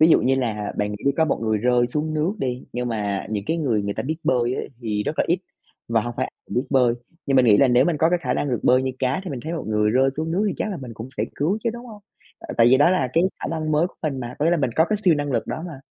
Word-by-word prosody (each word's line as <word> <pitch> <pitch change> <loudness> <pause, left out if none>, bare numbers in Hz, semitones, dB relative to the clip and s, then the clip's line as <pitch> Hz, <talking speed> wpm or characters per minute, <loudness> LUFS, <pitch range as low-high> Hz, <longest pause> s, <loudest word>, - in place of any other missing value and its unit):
Ví 160 - +7
dụ - - +6
như 130 +2 +2
là, 110 -6 -2
bạn 105 0 0
nghĩ - - -4
đi, 140 - +3
có 160 - +4
một 150 - -1
người 110 -1 +1
rơi 120 +2 +3
xuống 155 +4 -2
nước 155 +6 +1
đi, 125 -4 -3
nhưng 125 0 -2
mà 105 -4 -2
những 105 -2 -2
cái 165 - 0
người 120 -10 0
người 100 0 -3
ta - - -3
biết 155 +4 -2
bơi 125 -1 +2
á - - -3 0.2
thì 105 -2 -1
rất 105 - -2
là - - +3
ít 175 +2 +2 0.5
và 115 -1 +2
hông 120 +2 -5
phải - - -2
cũng - - -7
biết 125 - +1
bơi, 125 -3 +4 0.3
nhưng 135 -2 +2
mà 130 - +6
nghĩ 110 -4 +6
là 135 - +5
nếu 125 +1 +5
mình 170 -1 +1
có 160 +2 +3
cái 180 - +2
khả 125 -2 0
năng 145 - -1
được 120 - -1
bơi 130 +1 +5
như 130 - -1
cá 130 +5 0
thì 180 - -5
mình 130 - -5
thấy 160 - -3
một 165 - -4
người 105 0 +1
rơi 130 +3 +3
xuống 160 +1 -2
nước 195 +5 +1
thì - - -2
chắc 215 - -2
là 195 - -3
mình 130 -5 -8
cũng 115 +3 -8
sẽ - - 0
cứu 175 +9 0
chứ, 230 - +2
đúng 240 +2 -9
hông? 210 -3 -12 0.4
Ờ, - - -8
tại 115 0 +6
vì 130 - +7
đó 145 +6 +5
là 140 -9 +1
cái 165 +2 +3 0.2
khả - - -2
năng 155 -1 -2
mới 155 +3 +3
của - - -14
mình 140 -4 -2
mà, 120 0 -6
có 150 - 0
nghĩa 165 - +4
là 175 - +3
mình 135 -6 0
có 160 - +5
cái 210 +5 0
siêu 175 -4 +6
năng 145 -1 -2
lực - - -1
đó 160 - -4
mà. 155 -6 -9
135 Hz, 335 wpm, -23 LUFS, 120-160 Hz, 0.5 s, Ví